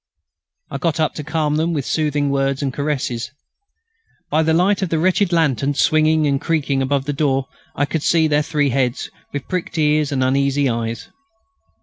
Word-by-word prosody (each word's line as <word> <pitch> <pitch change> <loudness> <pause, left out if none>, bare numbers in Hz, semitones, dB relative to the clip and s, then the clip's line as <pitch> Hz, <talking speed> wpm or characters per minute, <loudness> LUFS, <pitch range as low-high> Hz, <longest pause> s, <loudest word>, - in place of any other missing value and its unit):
I 140 - -4
got 165 0 -1
up 155 - +1
to 150 - -6
calm 150 0 -1
them 165 +2 0
with 145 -4 -2
soothing 150 -2 0
words 135 0 0
and 135 -2 -2
caresses. 130 -5 -2 1.0
By 155 +2 +3
the 160 0 +1
light 185 +5 +2
of 190 - -1
the 165 - 0
wretched 185 +3 +2
lantern 145 -4 +1
swinging 155 +1 +3
and 140 -1 0
creaking 145 -4 0
above 135 0 0
the 145 - -2
door 135 -2 0 0.3
I 145 - +1
could 160 +1 -3
see 160 +1 +3
their 150 -1 +2
three 150 -2 0
heads, 125 0 -1 0.2
with 145 -2 -5
pricked 180 -2 -4
ears 150 -1 +2
and 130 -2 0
uneasy 140 +2 +1
eyes. 115 -1 -3
145 Hz, 185 wpm, -19 LUFS, 135-160 Hz, 1.0 s, By